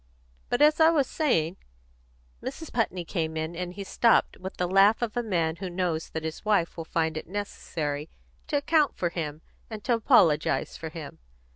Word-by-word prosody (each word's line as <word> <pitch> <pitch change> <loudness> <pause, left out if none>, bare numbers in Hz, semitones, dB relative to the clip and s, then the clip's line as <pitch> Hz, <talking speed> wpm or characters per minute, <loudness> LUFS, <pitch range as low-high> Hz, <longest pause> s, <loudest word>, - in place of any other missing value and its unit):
But, 245 +4 +3
as 305 +1 +5
I 320 0 +7
was 305 -5 +3
saying 190 - 0 0.4
" - - -32
Mrs. 320 - -6
Putney 190 -7 -1
came 160 -2 -2
in, 160 +2 -3
and 180 +1 -4
he 200 - -5
stopped 230 +4 +3
with 190 +1 -8
the 180 - 0
laugh 195 +5 +5
of 230 -1 -3
a 240 - +1
man 170 -7 0
who 185 0 -5
knows 175 -3 -2
that 160 - -5
his 160 0 -5
wife 205 -6 +1
will 165 - -6
find 160 -1 -1
it - - -6
necessary 155 -6 -4 0.4
to 290 - +1
account 295 0 +2
for 175 - -1
him 155 -2 -5 0.3
and 215 -2 -8
apologise 170 -10 +3
for 160 - -6
him. 155 -2 -9
175 Hz, 185 wpm, -27 LUFS, 160-220 Hz, 0.4 s, I